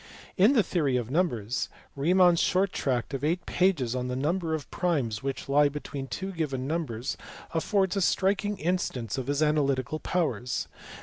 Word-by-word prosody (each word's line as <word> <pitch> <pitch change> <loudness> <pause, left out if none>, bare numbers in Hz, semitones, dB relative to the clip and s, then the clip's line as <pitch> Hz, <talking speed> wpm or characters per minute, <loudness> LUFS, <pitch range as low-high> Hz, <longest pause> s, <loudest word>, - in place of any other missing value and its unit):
In 205 +8 +5
the 230 -6 +4
theory 145 -10 +1
of 120 0 -3
numbers, 130 - 0 0.3
Riemann 175 +5 +5
s 170 - 0
short 185 +1 +2
tract 125 0 -1
of 135 - -3
eight 175 +4 0
pages 160 -10 +1
on 125 0 -2
the 125 - -2
number 160 +4 0
of 145 -5 -6
primes 135 - 0
which 135 0 -4
lie 145 +1 +4
between 140 -1 -6
two 190 +7 -4
given 145 -7 -2
numbers 140 -6 -2 0.4
affords 190 +3 +1
a 195 - +1
striking 200 +2 +1
instance 155 - -1
of 130 - -5
his 145 +2 +1
analytical 150 -1 +1
powers. 125 - -1
150 Hz, 170 wpm, -28 LUFS, 130-180 Hz, 0.4 s, In